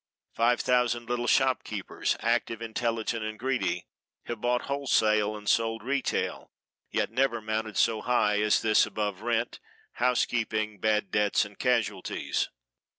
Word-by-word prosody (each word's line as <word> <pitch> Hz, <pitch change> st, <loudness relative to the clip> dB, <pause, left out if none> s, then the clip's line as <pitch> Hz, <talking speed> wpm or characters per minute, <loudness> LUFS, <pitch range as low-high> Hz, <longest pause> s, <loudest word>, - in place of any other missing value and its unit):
Five 120 Hz, +1 st, +2 dB
thousand 120 Hz, -2 st, +1 dB
little 120 Hz, 0 st, -1 dB
shopkeepers, 125 Hz, -7 st, 0 dB
active, 115 Hz, -, 0 dB
intelligent 115 Hz, 0 st, -2 dB
and 110 Hz, 0 st, -4 dB
greedy, 120 Hz, -9 st, -1 dB, 0.4 s
have 120 Hz, -2 st, -6 dB
bought 125 Hz, 0 st, +1 dB
wholesale 110 Hz, -7 st, +1 dB
and 105 Hz, 0 st, -12 dB
sold 115 Hz, -1 st, +1 dB
retail, 140 Hz, +2 st, -1 dB, 0.4 s
yet -, -, -1 dB
never 130 Hz, -3 st, +1 dB
mounted 110 Hz, 0 st, -3 dB
so 110 Hz, -2 st, +2 dB
high 105 Hz, -4 st, +2 dB
as 105 Hz, 0 st, +2 dB
this 110 Hz, -1 st, +4 dB
above 105 Hz, -2 st, -3 dB
rent, 115 Hz, 0 st, -1 dB, 0.3 s
housekeeping, 110 Hz, -4 st, 0 dB
bad 105 Hz, -2 st, +1 dB
debts 105 Hz, -1 st, +2 dB
and -, -, -13 dB
casualties. -, -, 0 dB
115 Hz, 130 wpm, -28 LUFS, 110-120 Hz, 0.4 s, this